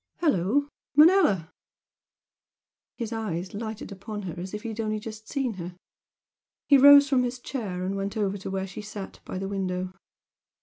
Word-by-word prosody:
Hello, 280 - +2 0.3
Manella!" 295 - +5 1.5
His 235 -2 -4
eyes 190 -5 -3
lighted 220 0 -6
upon 205 +2 -6
her 175 -4 -5
as 185 +1 -6
if 210 +1 -6
he 230 - -4
had 220 0 -7
only 215 -1 -1
just 220 0 -9
seen 270 -5 -1
her. 175 +1 -7 0.9
He 280 -2 +7
rose 285 +1 +9
from 265 -2 +3
his 250 0 -2
chair 205 -8 -4
and 195 +1 -2
went 195 +2 -3
over 200 -1 -1
to 195 - -6
where 190 0 -2
she 195 +2 -8
sat 210 -2 -8
by - - -5
the 195 +1 -3
window. 185 -2 -3
210 Hz, 170 wpm, -27 LUFS, 190-240 Hz, 1.5 s, rose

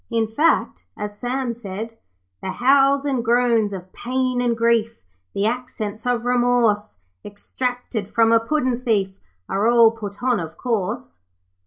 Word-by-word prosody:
In 230 -2 +1
fact, 300 +10 +1
as 210 0 -5
Sam 250 0 -2
said 225 0 -7 0.5
'The 190 - -4
howls 275 +2 +3
and 265 -4 0
groans 235 -3 +2
of 185 -1 -8
pain 255 0 -1
and 240 -2 0
grief, 230 -1 +1 0.4
The 200 - 0
accents 225 -2 -3
of 245 -1 0
remorse, 240 - +2 0.3
Extracted 235 0 -4
from 225 0 +3
a 230 - +6
puddin' 255 0 0
thief 205 -6 0 0.3
Are 200 +3 0
all 235 -1 +6
put 210 -1 -8
on, 250 -3 +2
of 160 -1 -7
course.' 185 - -3
230 Hz, 145 wpm, -22 LUFS, 210-245 Hz, 0.5 s, a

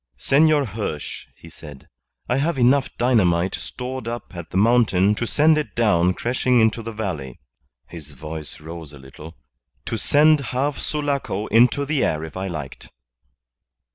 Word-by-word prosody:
"Senor 145 - +3
Hirsch," 100 - -5
he - - -14
said, 75 -4 -13 0.4
"I 125 - +1
have 150 +2 0
enough 130 +2 +3
dynamite 95 -8 +2
stored 125 -1 -6
up 120 -4 -6
at 85 -1 -8
the - - -3
mountain 105 -3 +3
to 120 +2 -3
send 155 +4 +3
it 150 - -6
down 90 -6 +2
crashing 125 +1 +1
into 110 +1 +2
the 115 +1 -6
valley" 90 - -5 0.5
his 75 -4 -10
voice 75 +2 -8
rose 80 -1 -9
a - - -11
little 70 +3 -13 0.5
"to - - -3
send 150 +1 +4
half 135 +2 -2
Sulaco 140 -9 -2
into 125 +5 +4
the 150 -1 0
air 75 0 -1
if 80 - -9
I 95 +1 -3
liked." 75 -6 -7
110 Hz, 155 wpm, -22 LUFS, 85-130 Hz, 0.5 s, send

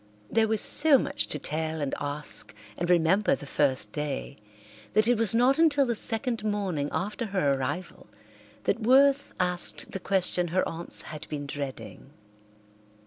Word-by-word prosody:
There 225 -1 +3
was 220 -1 0
so 295 -2 +4
much - - -2
to - - -2
tell 160 +2 -3
and 140 -2 -3
ask 145 -5 -4 0.2
and 175 0 -3
remember 180 +4 +3
the 145 - -10
first 130 -7 0
day 145 0 -4 0.6
that 215 +1 +4
it 245 - +4
was 225 -1 +2
not 255 +5 +3
until 290 -4 +4
the 240 - 0
second 225 0 +3
morning 195 -9 -2
after 210 +4 -3
her 185 -9 +1
arrival 140 +7 -5 0.6
that - - 0
Worth 275 +4 +3
asked 180 -1 +1
the 195 - -5
question 180 -2 +1
her 185 +3 0
aunts 170 +1 -4
had 155 -2 -9
been 145 -1 -5
dreading. 140 -1 -7
180 Hz, 155 wpm, -27 LUFS, 150-225 Hz, 0.6 s, so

